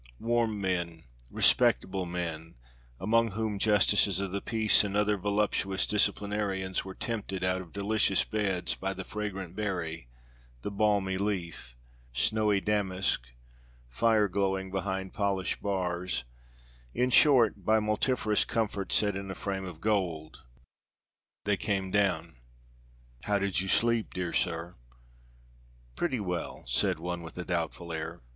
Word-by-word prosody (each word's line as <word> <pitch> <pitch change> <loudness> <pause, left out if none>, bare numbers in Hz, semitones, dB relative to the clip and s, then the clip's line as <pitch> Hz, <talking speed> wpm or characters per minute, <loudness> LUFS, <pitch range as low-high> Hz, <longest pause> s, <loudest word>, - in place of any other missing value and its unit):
Warm 115 -2 0
men, 85 -4 -2 0.3
respectable 95 +8 +4
men, 85 -2 -5 0.4
among 115 +2 +2
whom 110 -1 -2
justices 105 -2 +4
of 100 -2 -3
the 100 +1 -2
peace 110 -2 +3
and 100 0 -2
other 105 0 +2
voluptuous 100 -1 0
disciplinarians, 100 -2 0
were 95 -1 -8
tempted 105 -5 -3
out 95 0 +1
of 85 -3 -12
delicious 100 -1 +2
beds 100 -5 -1
by 95 0 -3
the 95 - -5
fragrant 95 -4 -5
berry, 85 - -3 0.5
the 105 - -3
balmy 100 -2 +1
leaf, 85 -11 -3 0.4
snowy 105 - +2
damask, 95 - 0 0.6
fire 105 - +3
glowing 95 0 -1
behind 95 -1 -3
polished 100 -3 -1
bars 90 -4 -1 0.7
in 125 +1 +1
short, 120 -8 +5
by 110 +3 +4
multifarious 105 0 +1
comfort 105 -4 -2
set 105 -2 +2
in 100 0 -5
a 95 - -4
frame 95 -2 -3
of 90 -4 -8
gold. 85 -6 -1 1.0
They 105 -1 +2
came 95 -3 -1
down. 100 -10 0 0.9
"How 105 -1 +2
did 100 -2 +1
you 95 - -3
sleep, 115 +2 +2
dear 90 -2 -2
sir?" 85 0 -1 1.2
"Pretty 130 - -1
well," 90 -4 -4
said - - +1
one 90 +1 -4
with 80 +1 -10
a 90 - -4
doubtful 85 -1 -3
air. 80 0 -5
95 Hz, 130 wpm, -29 LUFS, 90-105 Hz, 1.2 s, short